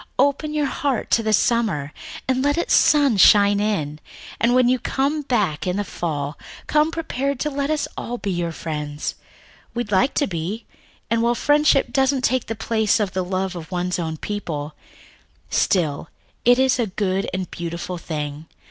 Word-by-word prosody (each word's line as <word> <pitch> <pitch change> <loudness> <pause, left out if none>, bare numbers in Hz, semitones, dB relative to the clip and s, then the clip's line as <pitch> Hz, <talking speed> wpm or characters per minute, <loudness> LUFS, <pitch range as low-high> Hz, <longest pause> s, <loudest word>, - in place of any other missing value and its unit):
Open 285 +3 +2
your 300 -1 0
heart 275 -2 -2
to 230 - +4
the 220 -1 0
summer, 210 -10 +1 0.3
and 260 0 +1
let 290 +2 +1
its 340 - 0
sunshine 205 -8 +5
in, 155 -9 -1 0.4
and 240 +2 +3
when 255 -1 +5
you 255 +1 +2
come 280 +5 0
back 210 - 0
in 180 +1 0
the 205 - 0
fall, 150 -6 -4 0.3
come 305 +1 +3
prepared 280 -5 -2
to 300 - -1
let 280 +1 -2
us 310 -1 0
all 245 +1 -4
be 200 -4 -3
your 175 -2 -1
friends. 150 -2 -4 0.6
We'd 240 -3 -3
like 210 +8 +2
to 290 - +2
be, 185 +4 -4 0.5
and 230 0 +2
while 235 +1 +2
friendship 290 +1 +3
doesn't 270 -1 +2
take 255 0 +1
the 225 - -3
place 220 -1 +1
of 205 -3 -1
the 185 - -1
love 185 +1 -2
of 165 -2 -8
one's 180 0 -2
own 160 -2 -3
people, 155 -7 -4 0.8
still 160 -5 +1 0.4
it 245 +1 +6
is 260 0 +3
a 235 - +1
good 190 0 -1
and 185 -1 -4
beautiful 170 +1 -5
thing. 150 -1 -5
210 Hz, 175 wpm, -22 LUFS, 175-260 Hz, 0.8 s, it